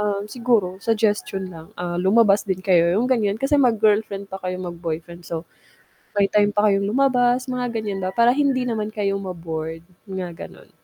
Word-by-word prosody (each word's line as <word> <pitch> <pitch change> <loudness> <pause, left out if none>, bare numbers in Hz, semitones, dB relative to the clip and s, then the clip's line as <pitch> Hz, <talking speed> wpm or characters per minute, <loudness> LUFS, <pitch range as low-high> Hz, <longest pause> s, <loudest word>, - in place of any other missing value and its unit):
um, 205 -1 -1
siguro 210 -5 0
suggestion 210 -4 0
lang, 165 -1 -11
ah, 175 0 -3
lumabas 200 +1 +4
din 185 -1 -2
kayo 175 -3 +4
yung 225 - +2
gan'yan. 225 -6 +1
Kasi 275 +5 +2
mag-girlfriend 215 -4 +2
pa 190 - -5
kayo, 185 -1 -3
mag-boyfriend 170 -1 -6
so, 165 -1 -4 0.7
may 200 - +4
time 205 0 +4
pa 210 0 +4
kayong 200 0 +1
lumabas, 250 0 +2
mga 250 -1 -2
ganyan 210 -3 -3
ba, 185 - -2
para 235 +2 +5
hindi 275 -2 +1
naman 220 -3 -2
kayo 200 -2 -1
ma-bored, 165 -3 -5 0.3
mga 185 -3 -5
gano'n. - - -17
200 Hz, 170 wpm, -22 LUFS, 185-230 Hz, 0.7 s, para